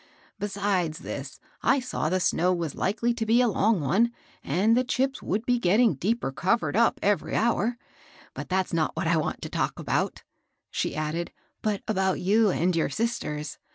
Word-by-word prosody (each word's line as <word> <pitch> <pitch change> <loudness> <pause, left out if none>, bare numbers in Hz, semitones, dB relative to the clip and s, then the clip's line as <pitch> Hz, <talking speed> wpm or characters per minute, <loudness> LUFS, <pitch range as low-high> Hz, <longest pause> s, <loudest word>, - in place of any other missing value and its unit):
Besides 195 -5 -1
this, 135 0 -7 0.2
I 270 +4 +3
saw 250 -11 -2
the 185 +2 +1
snow 180 0 +2
was 165 -4 -3
likely 230 +4 0
to 235 -1 -3
be 225 +2 +3
a 250 - +4
long 215 -2 +2
one, 195 - +2 0.3
and 195 +10 +2
the 250 - +3
chips 260 +2 -1
would 215 +5 -2
be 245 -1 +2
getting 215 +2 +4
deeper 195 - -1
covered 175 - 0
up 230 +1 +3
every 205 0 +1
hour. 235 +1 +1 0.6
But - - -7
that's 190 0 0
not 160 -2 0
what - - -2
I 165 0 +3
want 155 - -2
to - - -5
talk - - -1
about," - - -1 0.5
she - - -2
added, 155 +3 -2 0.3
"but 210 -2 -1
about 190 -3 +1
you 210 +3 +3
and 180 -1 +1
your 165 - +1
sisters. 150 - -3
200 Hz, 180 wpm, -26 LUFS, 170-230 Hz, 0.6 s, a